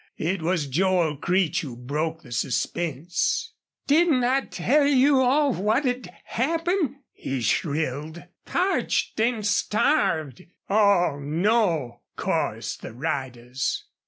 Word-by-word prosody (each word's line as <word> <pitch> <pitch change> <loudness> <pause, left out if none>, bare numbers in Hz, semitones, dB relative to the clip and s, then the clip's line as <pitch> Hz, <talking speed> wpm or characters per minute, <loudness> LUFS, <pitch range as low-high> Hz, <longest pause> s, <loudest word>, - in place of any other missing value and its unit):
It 180 +3 -1
was 165 -2 0
Joel 170 +2 +1
Creech 175 +2 +1
who 135 -6 -7
broke 155 +6 -3
the 120 - -14
suspense. 165 +7 -1 0.3
"Didn't 295 -3 +3
I 260 +3 +2
tell 280 +2 +1
you 275 0 +4
all 275 +2 +3
what'd 245 +5 0
happen?" 325 - -1
he 135 -1 -4
shrilled. 150 +6 -1 0.2
"PARCHED 370 - 0
AN' 230 -1 +1
STARVED!" 205 - +1 0.2
"Aw 200 -8 +3
no!" 160 - 0 0.2
chorused - - -2
the - - -8
riders. 130 -2 -3
180 Hz, 105 wpm, -25 LUFS, -, 0.3 s, you